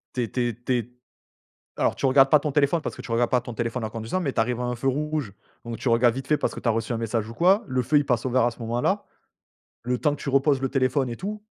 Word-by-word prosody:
Tu 125 - 0
es 110 - -5
tu 125 - -3
es 120 -1 -1
tu 130 - +1
es 120 -3 0 0.9
alors - - +1
tu - - -7
regardes 135 +1 +6
pas 150 -2 +6
ton 150 -2 -2
téléphone 145 +3 +2
parce - - -4
que - - -9
tu - - -10
regardes 120 +1 +1
pas 125 -1 +3
ton 120 -1 -8
téléphone 115 0 -2
en 110 - -3
conduisant, 115 +10 -3
mais 140 -6 -1
tu - - 0
arrives 120 +1 0
à - - -2
un 125 0 -2
feu 135 +3 -1
rouge. 150 -5 -2 0.3
Donc 115 -1 -6
tu 130 - -2
regardes 115 0 +4
vite 135 +1 -6
fait 150 - +3
parce - - -2
que - - -7
tu 120 - -1
as - - +4
reçu 115 +2 -2
un 115 - -1
message 115 -1 -2
ou - - -9
quoi, 190 - +4
le 130 -1 0
feu 150 +5 +1
il 145 - 0
passe 120 0 0
au - - -1
vert 130 -1 +3
à 120 - +2
ce 115 - -15
moment-là. 120 +1 -1 0.8
Le 125 +1 -1
temps 150 -2 +1
que - - -17
tu - - -5
reposes 135 0 +3
le 135 - 0
téléphone 130 -1 +1
et 115 - -5
tout, 210 +2 -6
125 Hz, 310 wpm, -25 LUFS, 115-140 Hz, 0.9 s, regardes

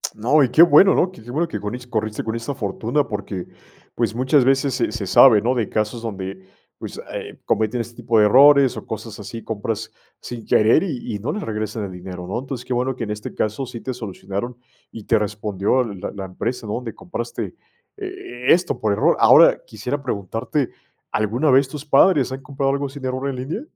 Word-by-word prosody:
No, 135 +7 +3
y 125 - +2
qué 160 - +5
bueno, 175 +4 +6
¿no?, 185 - +2
qué 110 - -15
qué 120 - -13
bueno 165 +5 0
que 105 - -5
conis 120 +5 -5
corriste 110 -2 -2
con 110 +1 -3
esta 125 +4 -4
fortuna. 115 +7 -1
Porque, 100 -3 -5 0.5
pues, 115 -2 -1
muchas 130 +2 +3
veces 135 0 +2
se 125 - 0
se 110 -4 -4
sabe, 110 +1 +7
¿no?, 120 +4 +1
de 115 -4 -1
casos 110 +2 -2
donde, 95 -4 -6 0.3
pues, - - -8
eh, - - -7
cometen 110 +2 0
este 120 0 -9
tipo 115 -2 +1
de 105 - +6
errores 140 +3 +6
o - - -7
cosas 110 0 -7
así. 115 +3 -8
Compras 110 0 -4 0.3
sin 120 -2 -8
querer, 110 - +4
y 125 - -4
y 105 - -4
no 130 +9 -3
le 210 - -3
regresan 110 - -4
el 95 - -7
dinero, 90 0 -8
¿no? 100 - -2
Entonces, 130 -1 -6
qué 130 - -2
bueno 125 +1 0
que 120 - -5
en 105 - -4
este 105 0 -6
caso, 110 +5 -1
sí 120 -2 -8
te 130 - -4
solucionaron, 110 +1 -6 0.3
y 115 - -9
te 115 0 +2
respondió 105 +3 0
la 100 -5 -6
la 95 -1 -6
empresa, 115 +6 -4
¿no?, 105 - -3
donde 120 -3 -6
compraste 180 - -5 0.4
e 375 - -1
esto 180 +1 0
por 105 -2 +1
error. - - +2
Ahora, - - +7
quisiera 125 +7 -4
preguntarte, 120 - -2 0.4
¿alguna 115 +8 +1
vez 135 +1 +5
tus 150 +1 -8
padres 140 -2 +4
han 135 - -5
comprado 135 -1 -1
algo 140 0 -1
sin 140 0 -10
error 130 +2 -2
en 135 - -4
línea? 145 - -4
120 Hz, 210 wpm, -21 LUFS, 105-135 Hz, 0.5 s, sabe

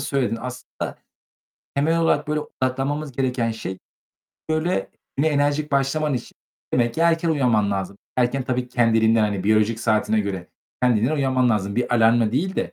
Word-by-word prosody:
söyledin. 135 -4 -1
Aslında 125 0 -6 0.8
temel 160 +4 +2
olarak, 155 -3 +1
böyle, 150 0 0
odaklanmamız 135 +2 -2
gereken 125 -2 0
şey, 100 -4 -5 0.7
böyle, 155 - 0 0.3
güne 145 +4 +2
enerjik 145 0 0
başlaman 140 +2 +1
için 125 - -5 0.4
demek 120 -1 +1
ki - - -3
erken 165 0 +3
uyanman 120 -9 +2
lazım. 100 0 -3 0.2
Erken 130 +2 +1
tabii 125 0 -1
ki 125 - -25
kendiliğinden, 115 -1 +4
hani, 105 -3 0
biyolojik 110 +2 +2
saatine 110 -1 +2
göre 95 -3 -4 0.4
kendiliğinden 125 +3 +3
uyanman 130 -3 +2
lazım. 100 -2 -1
Bir 125 0 +1
alarmla 115 -1 +4
değil 180 +9 0
de - - -2
125 Hz, 155 wpm, -23 LUFS, 110-145 Hz, 0.8 s, kendiliğinden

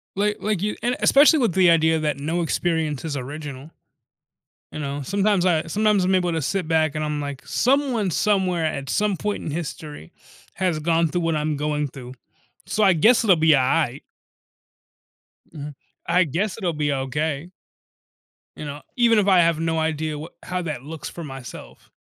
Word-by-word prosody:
like 210 +1 0
like, 210 -4 -1
you 210 +1 -1
and 245 +3 0
especially 295 +3 +6
with 230 -9 +1
the 185 -1 +5
idea 160 -1 +3
that 150 -3 -1
no 160 +4 -1
experience 160 -3 -1
is 150 - -3
original 140 +2 -7 1.0
you - - -6
know? 140 0 -4
Sometimes 195 +3 +1
I 165 -2 +1
sometimes 210 +1 +2
I'm 190 - +2
able 180 -2 +1
to 160 - -1
sit 180 +4 -2
back 155 -2 +1
and 155 - -2
I'm 150 -1 -2
like, 140 -2 -6
"Someone 250 -7 +1
somewhere, 185 -3 +1
at 140 -4 -3
some 205 +1 0
point 210 -1 -3
in 155 - -4
history, 150 - -6 0.4
has 180 -4 -1
gone 165 +1 +2
through 175 +3 -2
what 165 -1 0
I'm 150 0 -1
going 150 0 -1
through. 125 -2 -10 0.5
So 215 - 0
I 190 -2 +6
guess 225 +9 +4
it'll 190 -5 +5
be 160 0 +3
aight." 135 -1 +2 1.5
Mhm. 145 -1 -7 0.3
I 180 +2 +4
guess 185 - -2
it'll 180 -6 -1
be 150 -1 -1
okay 145 +4 -2 1.1
You - - -7
know, 145 0 -7 0.2
even 230 -3 +4
if 200 - +1
I 190 -2 +5
have 165 -2 +3
no 165 0 0
idea 155 -1 -2
wha 155 +3 -7
how 180 0 -3
that 150 -6 -5
looks 155 0 -7
for 170 - -8
myself. 135 -4 -10
160 Hz, 180 wpm, -23 LUFS, 150-190 Hz, 1.5 s, especially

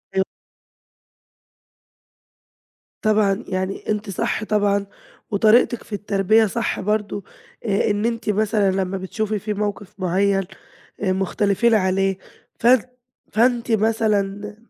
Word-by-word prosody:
أيوه. 190 0 +2 2.8
طبعًا 215 -1 +2
يعني 190 0 -3
أنتِ 210 0 -1
صح 195 +3 -1
طبعًا، 205 -2 +1 0.5
وطريقتِك 220 +3 +4
في 215 - -12
التربية 205 +2 +2
صح 230 +3 -2
برضو، 205 -1 -1 0.4
آآ، 200 -1 +1
إن 205 +1 0
أنتِ 230 -2 -2
مثلًا 210 -1 +2
لما 190 0 -1
بتشوفي 215 +3 -3
فيه 210 +2 -3
موقف 205 -1 -4
معين، 195 +2 +1 0.6
آآ 190 -2 +1
مختلفين 200 +4 +1
عليه، 195 -1 +2 0.4
فأن 245 0 +5 0.5
فأنتِ 240 +1 +2
مثلًا 210 -2 0
205 Hz, 105 wpm, -22 LUFS, 195-215 Hz, 2.8 s, فأن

